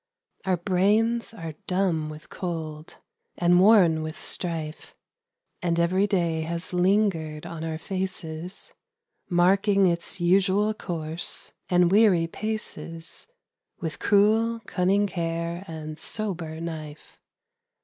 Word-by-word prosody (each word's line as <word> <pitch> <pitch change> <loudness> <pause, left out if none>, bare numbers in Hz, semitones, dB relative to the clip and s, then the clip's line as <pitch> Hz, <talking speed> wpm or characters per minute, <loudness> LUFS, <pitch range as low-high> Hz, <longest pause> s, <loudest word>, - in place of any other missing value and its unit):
Our 185 -2 +2
brains 210 +7 +2
are 165 -8 -7
dumb 180 -5 +1
with 155 0 -10
cold, 160 -3 -5 0.4
and 175 0 +4
worn 185 -6 +6
with 155 +1 -5
strife, 160 -3 -3 0.7
And 170 -1 +1
every 185 +4 +3
day 170 -5 +1
has 170 +3 -4
lingered 180 -5 +1
on 165 -1 -6
our 160 -1 -3
faces 180 -1 -5 0.6
Marking 195 +3 +4
its 170 +1 0
usual 195 +4 +3
course 165 -4 -3 0.2
and 180 -1 +4
weary 200 -5 +5
paces 170 - -5 0.5
With 165 -4 -4
cruel 225 +3 +3
cunning 195 +3 +2
care 170 -1 -3
and 155 -1 -7
sober 175 -5 -4
knife. 160 -3 -7
175 Hz, 110 wpm, -26 LUFS, 165-195 Hz, 0.7 s, worn